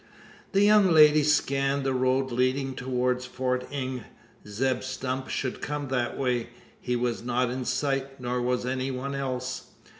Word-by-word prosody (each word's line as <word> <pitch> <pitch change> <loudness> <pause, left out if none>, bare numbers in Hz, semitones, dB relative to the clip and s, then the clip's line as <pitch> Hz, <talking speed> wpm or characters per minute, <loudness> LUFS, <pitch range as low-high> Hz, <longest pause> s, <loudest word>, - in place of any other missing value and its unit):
The 195 +1 +4
young 210 -2 +6
lady 155 -1 +7
scanned 140 -1 +1
the 135 0 0
road 130 +1 +1
leading 130 +2 0
towards 125 0 -1
Fort 125 0 -2
Inge. 130 -3 -3 0.5
Zeb 125 +5 0
Stump 130 0 -4
should 130 - -3
come 145 -2 -3
that 125 -2 -1
way. 125 -3 0 0.3
He 125 - -2
was 120 -4 -1
not 125 0 0
in 130 0 -4
sight; 135 +1 -1
nor 125 0 -2
was 125 0 0
any 130 +1 -1
one 135 +1 -4
else. 130 -2 -3
130 Hz, 155 wpm, -27 LUFS, 125-135 Hz, 0.5 s, lady